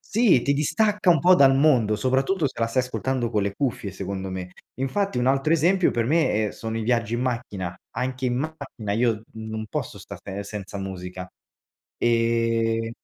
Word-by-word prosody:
Sì, 215 - +5
ti 140 - +2
distacca 210 +7 +2
un 165 - +5
po' 180 +6 +6
dal 135 -6 +6
mondo, 130 -7 +4
soprattutto 135 - +1
se 135 - -2
la 115 - +2
stai 125 +2 +1
ascoltando 125 -2 -2
con 105 - +1
le 100 0 -2
cuffie 120 -6 -2
secondo 95 0 -5
me. 90 -1 -6 0.2
Infatti 135 +6 -1
un 125 - +1
altro 135 +4 +2
esempio 175 +4 +3
per 115 -1 0
me, 130 -7 +2
eh, - - -8
sono 110 0 -5
i 115 - -2
viaggi 115 -1 +1
in 120 - -2
macchina, 110 -8 -3 0.2
anche 130 +1 -2
in 120 - 0
macchina 140 -8 -5
io 115 0 +1
non 110 0 -5
posso - - -4
stare 100 +1 -7
senza 100 -1 -7
musica, 90 -1 -6 0.7
ehm 115 -1 +1
120 Hz, 180 wpm, -24 LUFS, 105-135 Hz, 0.7 s, po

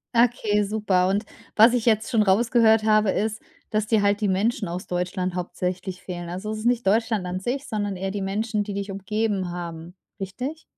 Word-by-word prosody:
Okay, 225 -3 +3
super. 195 -3 +1
Und 200 +3 0 0.3
was 225 +3 +7
ich 245 -2 0
jetzt 220 -1 +2
schon 220 -3 +3
rausgehört 220 +2 +4
habe, 215 -2 +4
ist, 220 +1 -1 0.3
dass 215 0 0
dir 215 -1 +2
halt 200 +1 +2
die 205 - +2
Menschen 205 +2 0
aus 180 +2 -5
Deutschland 180 0 -2
hauptsächlich 180 +1 -4
fehlen. 175 -2 -6
Also, 190 +4 -5
es 215 - -3
ist 220 - -7
nicht 240 -4 +1
Deutschland 220 -2 +2
an 180 +1 -3
sich, 265 +7 -3
sondern 205 -2 -2
eher 190 +1 -3
die 200 -1 -3
Menschen, 210 +2 -1
die 205 -1 -6
dich 200 0 -4
umgeben 200 -2 -1
haben, 170 -1 -7 0.3
richtig? 255 - -5
205 Hz, 195 wpm, -24 LUFS, 185-220 Hz, 0.3 s, was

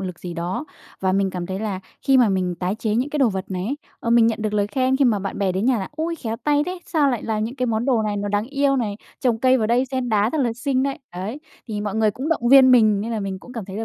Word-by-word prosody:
lực 180 -3 -5
gì 175 -1 -7
đó. 175 - -3 0.4
Và 190 0 +1
mình 195 0 +1
cảm 180 -1 -4
thấy 190 0 -4
là 200 -4 -3 0.2
khi 270 -1 +4
mà 240 -4 +5
mình 185 -2 0
tái 180 +3 -2
chế 215 -2 -1
những 255 +6 0
cái 300 - -2
đồ 265 -4 +4
vật 190 -2 -3
này 185 0 -3
ấy, 275 +7 -2 0.2
ờ, 230 - -2
mình 235 -1 +6
nhận 225 -1 -1
được 215 -1 -1
lời 205 -1 +2
khen 260 +4 +1
khi 280 - +3
mà 220 -5 +3
bạn 195 0 -5
bè 195 -2 +1
đến 190 +4 -1
nhà 255 -4 +3
là 190 - -4
"Ôi, 330 +2 -3
khéo 225 -5 -4
tay 295 0 +3
thế! 365 0 -4
Sao 290 -4 +2
lại 240 - -2
làm 215 -1 -1
những 235 +4 -5
cái 255 -1 0
món 225 0 0
đồ 245 -5 +2
này 210 -1 -1
nó 205 0 -2
đáng 205 +2 0
yêu 280 0 +1
này? 210 -5 -2 0.2
Trồng 240 -3 +1
cây 260 +2 +4
vào 220 - +1
đây 245 +3 +2
sen 260 -1 -3
đá 215 0 +2
rất 315 - -2
là 240 -3 +1
xinh 255 +2 -1
đấy." 275 0 -2 0.2
Đấy, 200 +10 -5 0.3
thì 210 -1 -3
mọi 205 -1 -3
người 220 -1 +3
cũng 265 +8 -5
động 240 -8 +1
viên 265 -1 +8
mình, 215 -5 +5
nên 225 +3 -4
là 220 - -2
mình 195 -1 -4
cũng 250 - -13
cảm 230 -5 -5
thấy 190 +1 -8
là 225 - -3
225 Hz, 315 wpm, -22 LUFS, 200-260 Hz, 0.4 s, viên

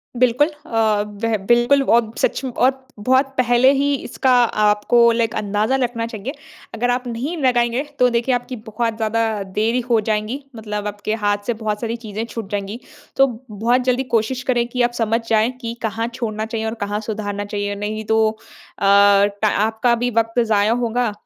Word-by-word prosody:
बिल्कुल। 255 +4 +3 0.2
अ, 225 - -2 0.4
वह 225 -1 +2
बिल्कुल 240 +4 +4
और 230 -3 +2
सच - - 0
में 260 - -3
और 260 +2 +1
बहुत 260 +5 +3
पहले 250 +1 +4
ही 280 +1 +1
इसका 260 0 -1 0.4
आपको 210 +3 +3
लाइक 230 -1 0
अंदाज़ा 210 +4 0
रखना 230 -1 -2
चाहिए। 230 +4 -6 0.4
अगर 245 +2 -1
आप 250 0 -2
नहीं 250 +9 -3
लगाएँगे 245 +1 +2 0.2
तो 250 0 +5
देखिए 240 +2 +1
आपकी 245 +1 -4
बहुत 225 +1 -1
ज़्यादा 220 -2 -1
देरी 230 +3 +2
हो 230 -2 +4
जाएँगी। 215 +6 -2
मतलब 210 -1 -4
आपके 205 +1 -3
हाथ 205 0 +2
से 240 - +1
बहुत 210 0 -2
सारी 230 0 -2
चीज़ें 215 +2 -4
छूट 225 -3 -7
जाएँगी। 205 +2 -4 0.4
तो 270 - +6 0.2
बहुत 230 +5 +1
जल्दी 255 +1 +1
कोशिश 245 +3 0
करें 240 -2 +1
कि 250 +1 -2
आप 240 - +2
समझ 225 +1 +1
जाएँ 220 +2 +3
कि 230 0 -4
कहाँ 225 +1 -2
छोड़ना 220 -3 -3
चाहिए 220 0 -4
और 220 - -2
कहाँ 205 +1 -2
सुधारना 205 -2 -4
चाहिए। 205 0 -3
नहीं 210 +2 -4
तो 220 0 +3 0.5
अ, - - -1 0.6
टा 215 - +3
आपका 220 +4 +1
भी 245 +1 -1
वक़्त 225 +1 +1
ज़ाया 215 -1 +2
होगा। 240 -1 0
230 Hz, 180 wpm, -20 LUFS, 215-245 Hz, 0.6 s, तो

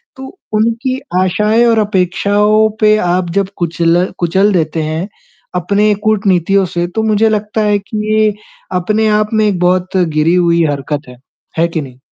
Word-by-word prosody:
तो 265 +8 -11 0.2
उनकी 230 +4 0 0.2
आशाएँ 210 +5 +2
और 230 -1 +3
अपेक्षाओं 210 +2 +1
पे 215 0 +5
आप 180 0 0
जब 195 -1 -2
कुचल 170 +1 +1
कुचल 190 +4 +2
देते 160 -2 -1
हैं 160 +4 -3 0.5
अपने 200 +4 +1
कूटनीतियों 195 -3 +2
से 175 0 -2
तो 220 - 0
मुझे 220 0 +2
लगता 215 0 -2
है 210 -1 +2
कि 200 +2 -7 0.2
ये 215 -1 +2 0.4
अपने 215 +5 0
आप 210 0 -1
में 215 -1 +2
एक 195 -4 -1
बहुत 180 +1 0
गिरी 165 -1 +1
हुई 170 -1 +2
हरकत 145 +1 -3
है, 125 - -13 0.4
है 170 - +3
कि 165 -1 -3
नहीं? 130 -3 -11
195 Hz, 165 wpm, -14 LUFS, 175-215 Hz, 0.5 s, पे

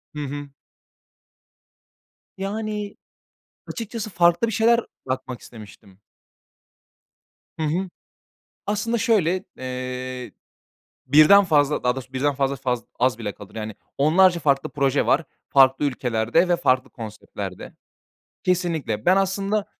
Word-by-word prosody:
Hı 150 - -3
hı. 145 +1 -6 1.9
Yani, 210 +1 -4 0.7
açıkçası 225 -2 -5
farklı 175 +4 +3
bir - - -3
şeyler 230 +2 +4 0.3
yapmak 130 -1 -4
istemiştim. 105 -3 -14 1.6
Hı - - 0
hı. 175 +5 -1 0.8
Aslında 220 +3 0
şöyle, 185 -5 +2
eee, 130 0 -5 0.7
1'den 155 +9 +7
fazla, 150 -4 +2
daha 125 0 +2
doğrusu 130 0 -8
birden 140 +2 +1
fazla 135 0 0
faz 125 -4 -2 0.2
az 125 -2 +2
bile 105 -3 -4
kalır. 100 +2 -14
Yani, 110 -1 -5 0.2
onlarca 170 +5 +4
farklı 140 -3 +1
proje 135 -2 +1
var 155 +4 +3 0.3
farklı 135 0 +5
ülkelerde 125 +4 +1
ve 175 - +4
farklı 130 -6 +1
konseptlerde. 110 -2 -8 0.7
Kesinlikle. 170 - -1
Ben 185 - +6
aslında 195 +2 0
145 Hz, 110 wpm, -23 LUFS, 130-190 Hz, 1.9 s, 1'den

